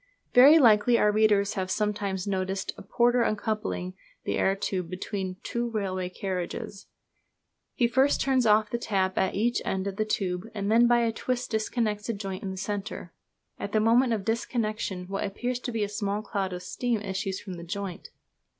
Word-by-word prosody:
Very 275 +6 +9
likely 235 -3 +5
our 210 - +4
readers 210 -2 +3
have 185 -1 -3
sometimes 200 -2 -1
noticed 190 -1 -2
a - - -11
porter 240 +4 +2
uncoupling 215 -4 -2 0.3
the - - -1
air 195 - +2
tube 185 -3 -3
between 185 0 -4
two 235 0 -2
railway 190 -4 -2
carriages. 190 +1 -5 0.9
He 240 - +3
first 265 +4 +3
turns 260 -3 +2
off 215 0 +4
the 235 - -1
tap 190 -5 0
at 190 - +1
each 235 +4 +1
end 190 0 -2
of 200 -1 -4
the 215 - +2
tube, 190 -2 -2
and 200 0 -1
then 235 +2 +6
by 240 0 +4
a 230 -1 +1
twist 250 +2 -3
disconnects 215 -1 -1
a - - +1
joint 195 -2 -5
in 195 - -4
the 190 - -6
centre. 200 -3 -5 0.5
At 200 - -5
the 215 - +4
moment 235 +3 +4
of 210 -3 -3
disconnection 215 -5 -2
what 195 +1 -3
appears 245 +5 -3
to 250 - -4
be 225 -2 -1
a - - 0
small 205 0 -2
cloud 195 -4 -2
of 180 0 -6
steam 240 +4 -1
issues 195 -1 -3
from 190 - -8
the 170 -1 -8
joint. 190 0 -5
210 Hz, 185 wpm, -27 LUFS, 190-230 Hz, 0.9 s, Very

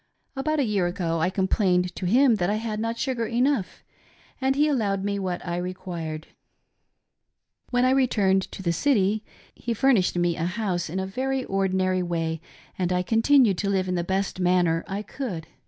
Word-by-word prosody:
About 305 +3 -1
a - - +3
year 200 -5 +1
ago 175 -2 -2
I 165 - +2
complained 185 -1 +1
to 185 - -2
him 245 +3 +4
that 175 -2 0
I 210 - +1
had 215 -1 -3
not 230 +1 -2
sugar 245 -4 -1
enough 245 -2 0 0.6
and 265 +1 +2
he 295 +2 +3
allowed 205 -9 0
me 200 0 -1
what 185 -2 -3
I 175 -1 -2
required. 175 -3 -5 1.4
When 245 0 +2
I 255 - +4
retiimed 200 -8 +2
to 190 - -9
the 170 -1 +1
city 215 - +1 0.3
he 235 -1 -4
furnished 225 -8 +3
me 175 -1 +1
a 165 - -1
house 180 -3 -2
in 185 +4 -3
a 190 - -2
very 260 +6 -2
ordinary 190 -1 0
way 165 -2 -2 0.4
and 180 -1 0
I 180 0 +1
continued 225 -2 +4
to 200 - -1
live 190 -2 0
in 180 - -1
the 175 -1 0
best 190 +1 -2
manner 175 -2 +2
I 200 +1 -4
could. 200 - -5
195 Hz, 185 wpm, -25 LUFS, 180-230 Hz, 1.4 s, him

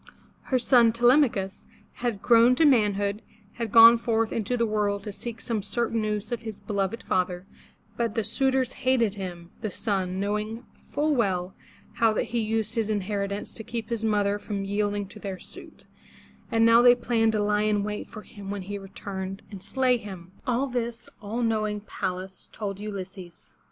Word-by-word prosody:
Her 260 - +1
son 240 -2 +5
Te 235 +2 -1
lem'a 270 +2 +6
chus, 195 0 -6 0.3
now 245 - +2
grown 235 +3 +4
to 320 - +4
man 220 -8 +4
hood, 205 +1 -2 0.4
had 230 -3 -2
gone 230 +1 +9
forth 225 -1 0
into 230 +2 -1
the 235 - +2
world 205 -2 0
to 210 - -5
seek 225 +3 -7
some 225 -3 -2
certain 225 +3 -1
news 210 0 -2
of 240 -2 -2
his 220 -3 -7
beloved 200 +1 -2
father, 180 0 -1 0.5
but 230 -2 -1
the 225 - +1
suitors 260 +3 +1
hated 245 -5 +2
him, 180 -4 -7
the 215 - -2
son, 190 -2 -2
knowing 210 +4 -2 0.2
full 300 +1 +1
well 190 -7 0 0.4
how 225 -1 +4
that - - -1
he 235 - +2
used 220 0 -1
his 220 -2 -1
influence 200 -1 -2
to 220 - -6
keep 230 -1 -5
his 230 -2 -2
mother 205 -2 +1
from 200 -2 -4
yielding 205 0 -1
to 210 - -12
their 195 -2 -5
suit, - - -13 0.7
and 225 0 +4
now 230 +1 +7
they 245 0 +7
planned 230 -2 +1
to 215 - +1
lie 210 0 +2
in 210 -1 +1
wait 210 0 -4
for 215 - -10
him 200 -3 -10
when 200 -1 -4
he 200 +2 -5
returned 195 0 -6
and 195 -3 -8
slay 255 +4 +2
him. 190 -5 -10 0.2
All 250 +2 +1
this, 240 -3 -4
all 220 +4 -3
knowing 215 -2 0
Pallas 185 -2 -5
told 200 -2 -5
Ulysses. 190 - -8
215 Hz, 185 wpm, -26 LUFS, 200-230 Hz, 0.7 s, gone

